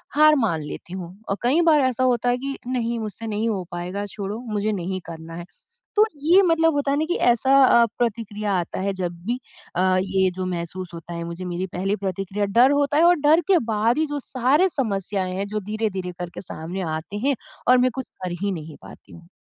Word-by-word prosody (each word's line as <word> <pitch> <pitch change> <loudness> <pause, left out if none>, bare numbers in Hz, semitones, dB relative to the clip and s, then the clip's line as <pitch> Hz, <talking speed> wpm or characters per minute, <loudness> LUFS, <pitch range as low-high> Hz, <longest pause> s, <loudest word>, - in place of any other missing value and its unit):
हार 305 +1 +7
मान 205 - +1
लेती 150 +4 -8
हूँ 180 -1 -7
और 195 - 0
कई 280 +8 +4
बार 310 -4 +5
ऐसा 260 -1 +1
होता 245 -1 +2
है 245 - +2
कि 275 +1 -4
नहीं 235 -2 -1
मुझसे 220 +1 -6
नहीं 220 +1 -1
हो 195 -4 -2
पाएगा, 180 +4 -4
छोड़ो 205 +2 -5
मुझे 210 +1 0
नहीं 185 -1 -3
करना 165 0 -8
है। 170 0 -7 0.5
तो 425 +1 +6 0.2
ये 350 +5 +6
मतलब 325 -2 +3
होता 285 -1 0
है 280 - +1
ना 310 - +1
कि 350 - +1
ऐसा 240 +2 +2
अ, 235 -2 +6
प्रतिक्रिया 215 -3 -1
आता 170 - -4
है 195 +1 -1
जब 180 -2 -3
भी 240 +3 -1 0.4
अ, 185 +1 +3
ये 190 0 +2
जो 185 0 -3
महसूस 180 0 -5
होता 170 +1 -8
है 170 0 -4
मुझे 170 +2 -6
मेरी 180 +1 -3
पहली 195 +3 0
प्रतिक्रिया, 195 +1 -2
डर 235 +7 +5
होता 285 0 +2
है 320 - +5
और 355 - +6
डर 305 +3 +5
के 375 -3 +5
बाद 225 +4 +2
ही 315 - +2
जो 290 0 -3
सारे 275 +8 +2
समस्याएँ 195 - -2
हैं, 195 +1 -2
जो 215 +1 -2
धीरे-धीरे 205 -3 -3
करके 175 -1 -6
सामने 180 +1 -6
आते 165 +6 -6
हैं 280 - +3 0.3
और 255 - +7
मैं 250 0 +3
कुछ 265 -2 -4 0.2
कर 180 - -2
ही 200 0 0
नहीं 160 -4 -6
पाती - - -14
हूँ। 170 0 -14
210 Hz, 220 wpm, -23 LUFS, 185-255 Hz, 0.5 s, हार